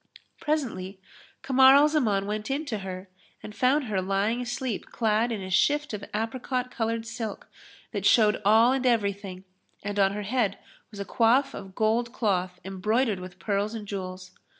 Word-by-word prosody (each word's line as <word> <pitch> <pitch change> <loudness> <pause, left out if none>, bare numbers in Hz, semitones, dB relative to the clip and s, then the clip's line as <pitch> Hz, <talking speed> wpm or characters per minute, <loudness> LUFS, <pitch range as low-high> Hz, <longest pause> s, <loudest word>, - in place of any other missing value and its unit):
Presently, 225 - -2 0.4
Kamar 265 0 +6
al 290 +2 +6
Zaman 220 -11 +1
went 210 +3 -4
in 285 +4 -1
to 220 -7 -3
her 190 0 -7 0.4
and 210 - -8
found 270 +5 +2
her 210 -6 -1
lying 200 +5 0
asleep 245 -2 -3
clad 225 +1 +1
in 210 -4 -3
a 185 - -7
shift 295 +8 +2
of 205 -1 -5
apricot 250 +3 -2
coloured 225 -1 -2
silk 225 -2 -6 0.4
that 205 -4 -3
showed 215 -3 +4
all 220 +4 +5
and 260 -1 +1
everything; 200 -5 -1 0.4
and 205 0 -3
on 195 0 +3
her 210 0 -4
head 210 -2 0 0.3
was 210 - -11
a 200 - -3
coif 245 +6 +3
of 190 -1 -9
gold 230 +2 +1
cloth 185 -6 -1
embroidered 210 +3 0
with 180 -1 -9
pearls 205 +2 -1
and 210 -2 -7
jewels. 185 -2 -6
215 Hz, 170 wpm, -27 LUFS, 195-245 Hz, 0.4 s, Kamar